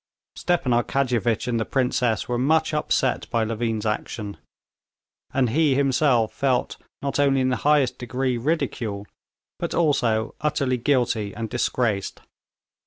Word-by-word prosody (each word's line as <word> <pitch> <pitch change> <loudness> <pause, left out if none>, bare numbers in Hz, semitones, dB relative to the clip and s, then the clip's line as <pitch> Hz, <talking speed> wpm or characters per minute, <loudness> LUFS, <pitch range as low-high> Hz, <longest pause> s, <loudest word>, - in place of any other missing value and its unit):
Stepan 175 -8 0
Arkadyevitch 120 -2 +1
and 120 -2 0
the - - +1
princess 125 -4 0
were 120 -1 -1
much 160 +4 +2
upset 135 -4 0
by 115 -2 +1
Levin's 115 -1 -2
action. 105 -1 -3 0.9
And 130 -4 +1
he 150 0 +3
himself 135 -4 +2
felt 130 -3 0 0.3
not 140 0 -1
only 140 -1 +3
in 130 0 +2
the 125 - 0
highest 145 -4 +2
degree 125 +1 -1
ridicule, 120 -8 -2 0.5
but - - -3
also 120 -9 +1
utterly 140 -4 0
guilty 120 -5 0
and 115 -1 -5
disgraced. 120 -4 -1
125 Hz, 130 wpm, -24 LUFS, 115-140 Hz, 0.9 s, he